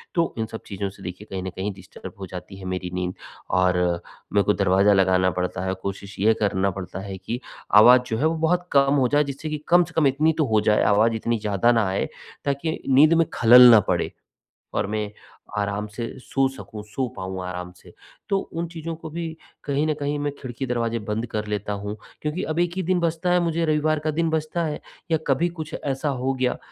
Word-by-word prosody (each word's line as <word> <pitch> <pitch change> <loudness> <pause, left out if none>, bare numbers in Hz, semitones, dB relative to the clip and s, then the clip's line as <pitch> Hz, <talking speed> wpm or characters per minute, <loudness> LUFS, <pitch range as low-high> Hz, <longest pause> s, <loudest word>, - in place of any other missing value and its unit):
तो 170 -1 +1
इन 110 - -1
सब 110 - -6
चीज़ों 100 -1 -3
से 95 0 -15
देखिए, 90 +4 -7
कहीं 95 -1 -3
न 95 - -3
कहीं 95 +2 -2
डिस्टर्ब 95 -1 -11
हो 95 - -5
जाती 95 +1 -8
है 95 - -10
मेरी 90 -1 -4
नींद। 90 0 -2 0.4
और 90 0 +3 0.6
मेरे 100 -1 +4
को 105 - +3
दरवाज़ा 100 +1 +4
लगाना 95 -1 +3
पड़ता 90 +1 -3
है, 95 - 0
कोशिश 100 +1 -6
ये 110 +3 +4
करना 100 -1 +1
पड़ता 95 0 -6
है 95 0 -6
कि, 115 +6 -5 0.4
आवाज़ 125 +4 +8
जो 110 - -1
है 145 - +1
वो 165 - 0
बहुत 180 +1 +1
कम 140 0 +4
हो 130 -3 +3
जाए, 145 +3 +3
जिससे 140 +2 -5
कि 155 - -2
कम 175 +1 +6
से - - -11
कम 155 -3 +4
इतनी 150 +4 +2
तो 155 - +2
हो 110 - +5
जाए, 105 0 +3
आवाज़ 110 +3 +4
इतनी 115 +1 -1
ज़्यादा 105 +2 +2
ना 115 -4 +2
आए, 95 - 0 0.4
ताकि 145 +3 -1
नींद 145 +5 +6
में 165 0 +4
ख़लल 125 +2 +9
ना 115 - +9
पड़े - - 0 0.6
और - - 0
मैं 105 0 -3 0.5
आराम 100 0 -1
से 115 0 -3
सो 135 +1 +1
सकूँ, 110 -5 -9
सो 125 +5 -2
पाऊँ 95 0 -4
आराम 90 0 -5
से। - - -17 0.4
तो 195 - +3
उन 170 -2 -5
चीज़ों 165 0 -6
को 160 0 -9
भी 170 +2 -4 0.4
कहीं 145 +1 0
न 155 - +2
कहीं 145 +1 -1
मैं 145 0 -1
खिड़की, 130 0 -5
दरवाजे 115 -2 -1
बंद 105 +2 -3
कर 105 -1 -3
लेता 105 0 -2
हूँ 100 +1 -5 0.3
क्योंकि 150 +4 -2
अब 160 - -1
1 175 0 +2
ही 190 - -1
दिन 180 +1 +1
बचता 170 +1 0
है, 180 - +4
मुझे 170 -1 0
रविवार 155 0 +1
का 155 +1 -1
दिन 165 +2 0
बचता 160 +2 -1
है, 150 -1 -3 0.3
या 160 - +4
कभी 140 +6 +2
कुछ 155 0 -6
ऐसा 140 +2 -1
हो 130 +2 0
गया 130 -1 0
120 Hz, 225 wpm, -24 LUFS, 100-155 Hz, 0.6 s, ख़लल